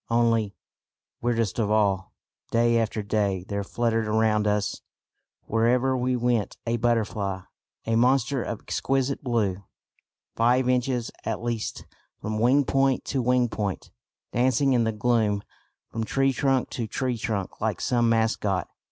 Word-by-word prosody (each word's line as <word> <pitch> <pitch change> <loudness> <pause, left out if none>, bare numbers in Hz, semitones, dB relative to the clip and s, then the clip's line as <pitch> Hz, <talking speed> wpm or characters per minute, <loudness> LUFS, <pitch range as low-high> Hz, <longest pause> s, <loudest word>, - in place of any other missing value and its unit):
Only 115 -3 +2 0.7
weirdest 115 -3 0
of 105 -2 +1
all 100 -3 +1 0.4
day 115 0 +3
after 110 -1 -1
day 100 -3 0
there 100 0 -2
fluttered 115 +1 0
round 105 -1 +2
us 105 -1 0 0.6
wherever 125 +4 +2
we 125 0 0
went 120 -3 0
a 115 0 0
butterfly, 105 -5 0 0.4
a 115 - +1
monster 130 +2 +2
of 115 -1 -4
exquisite 135 +1 -1
blue, 105 -7 0 0.7
five 125 +2 +3
inches 125 -1 0
at 115 0 -3
least 120 -2 -3 0.3
from 110 0 -3
wing 130 +5 +4
point 135 0 +1
to 135 - -1
wing 125 0 +3
point, 105 -4 -4 0.4
dancing 130 +3 +2
in 120 -2 +3
the 110 - +1
gloom 105 -2 +1 0.5
from 115 - -2
tree 135 +4 +1
trunk 135 -1 +1
to 115 -3 -3
tree 125 +3 -1
trunk 110 -5 -3
like 110 -4 -1
some 120 -2 +2
mascot. 110 -4 +1
115 Hz, 140 wpm, -26 LUFS, 105-125 Hz, 0.7 s, wing